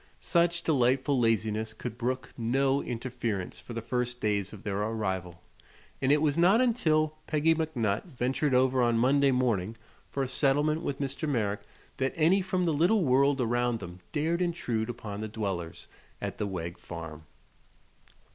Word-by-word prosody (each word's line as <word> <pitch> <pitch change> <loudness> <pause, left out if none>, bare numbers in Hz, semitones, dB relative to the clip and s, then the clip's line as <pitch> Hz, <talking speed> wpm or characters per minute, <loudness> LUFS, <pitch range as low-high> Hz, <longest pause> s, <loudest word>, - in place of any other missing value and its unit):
Such 170 0 +1
delightful 130 -1 +2
laziness 110 -1 +1
could 115 0 -6
brook 130 +2 -2
no 135 +4 +1
interference 120 -5 -4
for 120 - -9
the 115 -1 -4
first 125 +1 -2
days 100 -3 0
of 105 -2 -11
their 100 -2 -2
arrival, 95 -6 -3 0.6
and 135 0 +3
it 150 +1 +4
was 150 +1 +2
not 190 +6 +5
until 155 -11 +2
Peggy 155 +1 +3
McNutt 125 -11 -1
ventured 135 -2 0
over 130 0 +3
on 120 -1 +3
Monday 140 +4 +4
morning 115 -5 0 0.3
for 140 - -1
a - - -2
settlement 145 +4 +2
with 140 -5 -3
Mr. 140 +3 -3
Merrick 105 -6 0 0.4
that 130 0 0
any 175 +5 +4
from 185 -1 0
the 165 - +1
little 175 +7 +3
world 135 +2 +3
around 120 0 +1
them 90 -2 -9
dared 165 +3 0
intrude 125 -11 -1
upon 110 -3 -6
the 110 - -3
dwellers 95 -6 -4 0.3
at - - -5
the 105 - -1
Wegg 85 -3 -5
farm. 80 -2 -8
125 Hz, 160 wpm, -29 LUFS, 110-150 Hz, 0.6 s, not